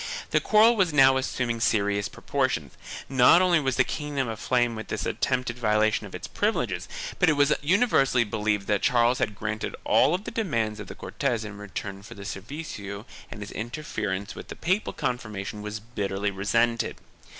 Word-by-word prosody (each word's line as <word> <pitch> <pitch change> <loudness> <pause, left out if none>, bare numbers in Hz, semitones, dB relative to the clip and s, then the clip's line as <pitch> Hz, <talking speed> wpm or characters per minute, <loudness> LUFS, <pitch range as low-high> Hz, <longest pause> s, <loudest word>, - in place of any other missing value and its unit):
The - - +4
quarrel 220 +2 +5
was 190 -6 +2
now 135 -2 +6
assuming 125 -3 -1
serious 100 -2 +1
proportions; - - -2 0.3
not 130 +5 +6
only 180 -3 +4
was 135 -3 0
the 130 - +4
kingdom 145 -2 -3
aflame 120 +2 0
with 110 -1 -7
this - - -3
attempted 125 -2 -1
violation 110 -1 +2
of 95 - -10
its - - -6
privileges 110 - -1 0.3
but 180 - +5
it - - +4
was 145 0 +4
universally 145 - +3
believed 105 -2 -1
that 105 -1 +1
Charles 120 0 +3
had 110 -6 -1
granted 105 +1 -3
all 145 +7 +4
the 200 - -8
demands 115 - -1
of 105 - -7
the - - -8
Cortes 115 -2 -2
in 105 -1 -7
return 100 -1 -6
for 100 - -11
the 100 - -9
servicio 100 -2 -6 0.2
and 105 - -8
his 105 - -7
interference 110 -5 -4
with - - -9
the - - -7
papal 190 +5 0
confirmation 105 -4 -4
was 105 +1 -5
bitterly 100 -2 -3
resented. 115 +4 +1
115 Hz, 170 wpm, -26 LUFS, 105-135 Hz, 0.3 s, now